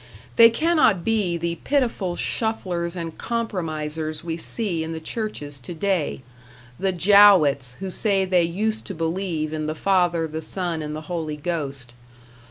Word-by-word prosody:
They 230 0 +9
cannot 230 - +2
be 210 -6 +1
the 170 0 -3
pitiful 235 -10 0
shufflers 180 -7 -2
and 165 -2 -5
compromisers 160 -9 -3
we 165 -1 -3
see 170 -1 -2
in 160 +1 -5
the 160 - -5
churches 160 -7 -5
today, 170 0 -2 0.6
the 195 0 +1
Jowetts 175 -9 +5
who 190 +4 -4
say 195 -1 +2
they 185 -1 +3
used 210 +6 -1
to - - -6
believe 165 -1 -2
in 155 -1 -3
the 155 - -3
Father, 175 -3 +1
the 160 +1 -5
Son 175 -1 -1
and 150 0 -5
the 155 - -5
Holy 155 -2 -4
Ghost. 140 -6 -4
170 Hz, 150 wpm, -23 LUFS, 155-195 Hz, 0.6 s, They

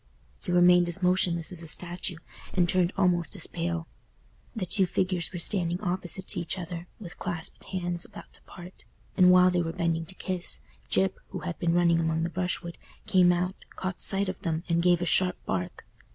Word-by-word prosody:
He - - -4
remained 175 0 +5
as 175 +2 -1
motionless 180 -2 +2
as 175 -2 -3
a 165 - -8
statue, 175 +2 -3 0.4
and 180 -2 +3
turned 180 0 +2
almost 180 -3 +3
as - - -1
pale. 170 -1 -3 0.7
The 210 -5 -2
two 185 +1 +2
figures 185 -2 -1
were 180 - -5
standing 175 -1 +1
opposite 185 -1 -3
to - - -3
each 170 +3 -2
other, 175 -1 -6
with 180 -5 -10
clasped 175 -2 -4
hands 175 -2 -3
about - - -12
to - - -9
part; 180 +1 -13 0.3
and 180 -2 +6
while 180 0 +6
they 180 -1 +1
were 165 -1 -2
bending 165 -1 -1
to 190 - -3
kiss, 185 -2 +1 0.3
Gyp, 190 -1 +2 0.2
who - - -7
had 175 -2 -5
been 170 0 +1
running 170 -1 +4
among 160 0 0
the 170 - -2
brushwood, 180 -1 -3 0.3
came 180 -2 +5
out, 180 +1 0 0.2
caught 185 -1 -4
sight 195 0 +2
of 185 0 -5
them, 165 -4 -2
and 170 -1 +1
gave 175 0 +3
a - - -1
sharp 180 +1 +3
bark. 90 -1 -4
175 Hz, 195 wpm, -27 LUFS, 170-185 Hz, 0.7 s, and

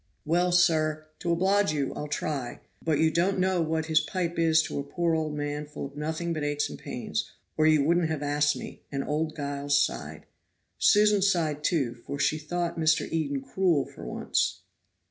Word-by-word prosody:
"Well, 175 +3 +2
sir, 155 -3 +3
to 170 - -1
oblige 190 +1 +2
you, 140 -3 -1
I'll 150 - -5
try; 145 -3 -3 0.2
but 160 -3 +1
you 160 +1 +3
don't 180 +5 +1
know 185 -1 +2
what 160 0 -1
his 160 -1 +4
pipe 175 -4 -2
is 160 -1 +4
to - - -4
a - - -2
poor 170 +4 -1
old 155 -2 -1
man 145 0 -3
full 150 -1 -6
of 140 0 -10
nothing 160 +3 -2
but 155 -2 -3
aches 145 0 -1
and - - -8
pains, - - -4 0.3
or 155 0 +3
you 155 -2 +5
wouldn't 170 +2 +2
have 155 -2 -2
asked 145 0 +2
me," - - -9
and 140 -1 -2
old 155 +1 -2
Giles 145 -1 0
sighed. 60 - -2 0.5
Susan 210 -1 +5
sighed, 165 -6 +1
too, 140 -8 +1
for 120 +4 -7
she 155 +2 +1
thought 170 +2 -3
Mr. 160 0 +2
Eden 145 -4 -1
cruel 155 +1 +1
for - - -12
once. - - -1
155 Hz, 190 wpm, -27 LUFS, 145-170 Hz, 0.5 s, you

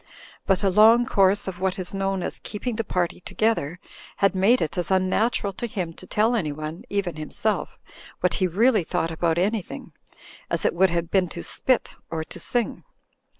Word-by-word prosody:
But 195 0 +2
a 195 - +3
long 225 +5 +6
course 200 -4 +2
of 185 -2 -5
what 190 0 0
is 185 0 -4
known 195 -1 -1
as - - -4
"keeping 225 +3 -4
the 230 - -1
party 180 -4 -1
together" 180 -5 -1 0.4
had 195 0 +3
made 200 +7 +4
it 160 - -2
as 175 -3 -1
unnatural 195 +3 +1
to 240 - -4
him 180 -6 -4
to 185 - -13
tell 220 +3 +2
anyone 155 -4 -4
(even 195 -5 -2
himself) 200 +7 -2 0.4
what - - +1
he 185 - +4
really 215 +3 +3
thought 165 0 -1
about 165 0 0
an3rthing, 200 +2 -2 0.6
as - - -1
it - - +3
would 190 +2 +4
have 170 -1 -2
been 185 -3 +2
to 170 - -7
spit— 255 -2 0 0.2
or 160 -1 -3
to - - -9
sing. 240 -2 -2
190 Hz, 185 wpm, -24 LUFS, 175-215 Hz, 0.6 s, long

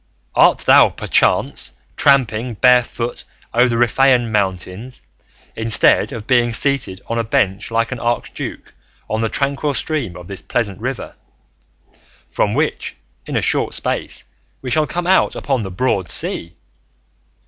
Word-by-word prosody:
Art - - +5
thou, - - +7
perchance, - - +1 0.2
tramping 125 -4 +2
barefoot 125 0 +2 0.3
over 120 +2 +4
the 120 - -1
Riphaean 120 0 +3
mountains, 100 +4 -3 0.5
instead 115 -1 +4
of 110 -2 -7
being 120 -2 +2
seated 120 -8 -1
on 115 0 -2
a - - 0
bench 100 -2 0
like 115 +1 0
an 125 - -4
archduke 120 +1 -4 0.3
on 110 +1 -2
the 115 - 0
tranquil 140 +2 -1
stream 130 - -1
of 90 0 -11
this 100 -1 -6
pleasant 105 -6 -2
river, 130 +1 -5 1.1
from - - -1
which - - -2 0.3
in - - -4
a - - 0
short - - +2
space - - -1 0.4
we 130 - -4
shall 155 +1 +2
come 175 0 -3
out 190 +1 +3
upon 135 -4 -1
the 95 - -5
broad 95 -3 -1
sea? 85 +1 -3
120 Hz, 140 wpm, -18 LUFS, 105-130 Hz, 1.1 s, thou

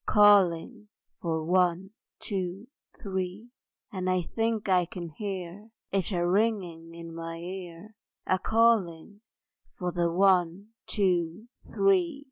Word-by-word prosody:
Calling 205 +1 +4 0.3
for 160 -2 -2
One, 180 +2 +1 0.3
Two, 190 0 -4 0.4
Three! 190 +3 -4 0.4
And 185 -3 -2
I 185 -1 +1
think 225 +3 -2
I 180 -2 +3
can 170 -1 -7
hear 195 +3 -6 0.2
It 195 0 0
a 175 -2 0
ringing 180 -5 -1
in 165 0 -9
my 165 0 -6
ear, 180 +3 -8 0.3
A 185 - +1
calling 205 -4 +1 0.6
for 180 -2 -2
the 170 -1 0
One, 185 +1 +2 0.2
Two, 180 -1 0 0.3
Three. 365 -6 +2
185 Hz, 115 wpm, -28 LUFS, 170-205 Hz, 0.6 s, Calling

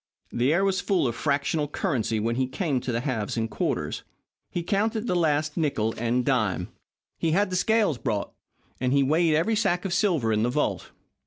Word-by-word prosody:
The 125 +4 +1
air 185 +5 +3
was 195 0 +1
full 190 -9 +1
of 120 - -1
fractional 145 +3 0
currency 125 - -1
when 115 +2 0
he 130 0 0
came 140 -1 -1
to 125 - -4
the 115 0 -1
halves 120 -6 -2
and 115 0 0
quarters. 105 - -2 0.5
He 175 - -3
counted 215 +4 0
the 180 - 0
last 155 -2 +1
nickle 115 -9 0
and 120 +2 0
dime. 110 -9 0 0.5
He 160 -1 +1
had 200 +1 +2
the - - -1
scales 205 - +2
brought, 100 - -2 0.5
and 125 +1 +1
he 140 0 +4
weighed 155 +3 +3
every 200 +8 +2
sack 180 -4 +1
of 185 - -1
silver 170 - +2
in 105 - +1
the 120 - +2
vault. 150 +4 -1
145 Hz, 195 wpm, -26 LUFS, 120-180 Hz, 0.5 s, he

